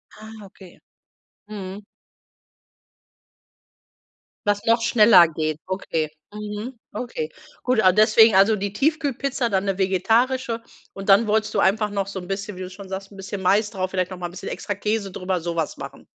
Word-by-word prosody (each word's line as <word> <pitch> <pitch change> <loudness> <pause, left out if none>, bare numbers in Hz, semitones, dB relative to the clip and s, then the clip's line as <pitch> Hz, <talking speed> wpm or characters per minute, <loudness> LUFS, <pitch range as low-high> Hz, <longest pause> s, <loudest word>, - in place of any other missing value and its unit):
Ah, 215 +1 -11
okay. 190 -2 -16 0.7
Mhm. 200 -1 -7 2.6
Was 205 0 +1
noch 230 0 +3
schneller 210 -6 +6
geht. 155 -1 -3
Okay. 165 -5 -2 0.2
Mhm. 210 +3 -6
Okay. 200 -11 -4 0.3
Gut, 250 -3 +2
ah, 185 - +7
deswegen 215 +2 +6
also 200 +3 +5
die 200 0 -3
Tiefkühlpizza, 275 -1 0
dann 195 0 0
'ne 195 -1 -1
vegetarische. 230 +6 +1 0.3
Und 195 +1 -7
dann 210 +3 +6
wolltest 215 0 +1
du - - +1
einfach 210 +2 +2
noch 200 -1 -2
so 195 -1 -5
'n 180 - -10
bisschen 200 +1 -4
wie 185 - -8
du 185 - -5
schon 195 +1 -11
sagst, 195 +1 -6
'n 195 - -13
bisschen 195 0 -6
Mais 205 +3 +3
drauf, 185 -2 -3
vielleicht 185 -1 -1
noch 185 - -6
mal 175 -1 -4
'n - - -12
bisschen 185 - -8
extra 205 - -4
Käse 210 -1 -2
drüber, 185 -1 -2
so 170 0 -3
was 160 - -1
machen. - - -9
200 Hz, 175 wpm, -23 LUFS, 185-220 Hz, 2.6 s, ah